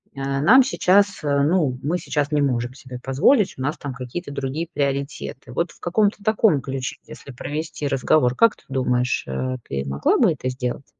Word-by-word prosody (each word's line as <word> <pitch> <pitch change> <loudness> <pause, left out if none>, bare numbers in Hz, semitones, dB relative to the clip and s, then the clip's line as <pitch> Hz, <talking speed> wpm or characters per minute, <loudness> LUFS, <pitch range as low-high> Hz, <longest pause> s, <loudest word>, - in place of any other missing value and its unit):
э, 135 - -8 0.2
нам 245 - +7
сейчас, 200 -5 +2
ну, 145 -1 +2
мы 165 +5 0
сейчас 150 -3 -2
не 150 - +2
можем 125 -2 -1
себе 130 -3 -9
позволить, 180 - +3
у - - -7
нас 145 +3 -1
там 140 -2 -5
какие-то 135 +5 -6
другие 140 +4 -3
приоритеты". 140 -1 -3
Вот 170 +5 -1
в - - -21
каком-то 205 +3 0
таком 215 - +3
ключе, 135 +2 -4
если 140 - -11
провести 150 +2 -4
разговор, 130 -1 +2
как 230 - +4
ты - - -23
думаешь, 125 -2 0
э, 130 - -3
ты 70 0 -3
могла 70 +1 +1
бы 220 -9 +5
это 130 -2 -4
сделать? 125 +1 -4
140 Hz, 180 wpm, -22 LUFS, 130-170 Hz, 0.2 s, нам